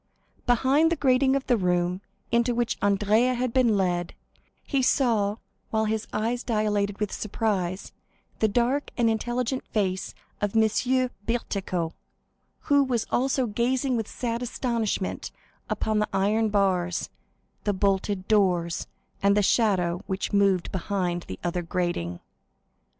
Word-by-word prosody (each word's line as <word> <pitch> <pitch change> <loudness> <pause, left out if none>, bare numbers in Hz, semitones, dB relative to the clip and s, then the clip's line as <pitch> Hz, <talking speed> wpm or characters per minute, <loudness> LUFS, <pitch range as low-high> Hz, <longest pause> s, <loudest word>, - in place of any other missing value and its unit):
Behind 270 +7 +3
the - - +3
grating 265 -2 +3
of 275 - -1
the 245 - +3
room 180 -1 0 0.3
into 235 +1 +2
which 240 -1 0
Andrea 210 +5 +3
had 245 -1 -1
been 240 -5 +3
led, 175 -2 -1 0.5
he 275 -2 0
saw, 225 -6 +2 0.3
while 220 0 +1
his 220 0 -2
eyes 230 +3 -1
dilated 210 -3 0
with 210 -2 -1
surprise, 195 -4 -2 0.5
the 220 - +4
dark 245 +7 +1
and 230 -2 +3
intelligent 245 +3 -1
face 190 -3 -1 0.3
of 205 +1 -1
M. 250 +4 +2 0.2
Bertuccio, 195 -7 -2 0.7
who 285 -1 +4
was 245 -4 -1
also 265 +1 +1
gazing 245 +4 0
with 225 -2 -2
sad 235 -1 -3
astonishment 235 -5 -2 0.4
upon 215 -1 0
the 210 - 0
iron 215 +3 +2
bars, 185 -4 0 0.5
the 205 - +1
bolted 195 0 0
doors, 180 -5 +2 0.3
and 200 +1 +4
the 205 - +3
shadow 185 -5 +2
which 190 +1 -3
moved 195 -3 +2
behind 180 -2 -2
the 95 - -6
other 175 +1 -1
grating. 170 - -2
215 Hz, 135 wpm, -26 LUFS, 190-240 Hz, 0.7 s, the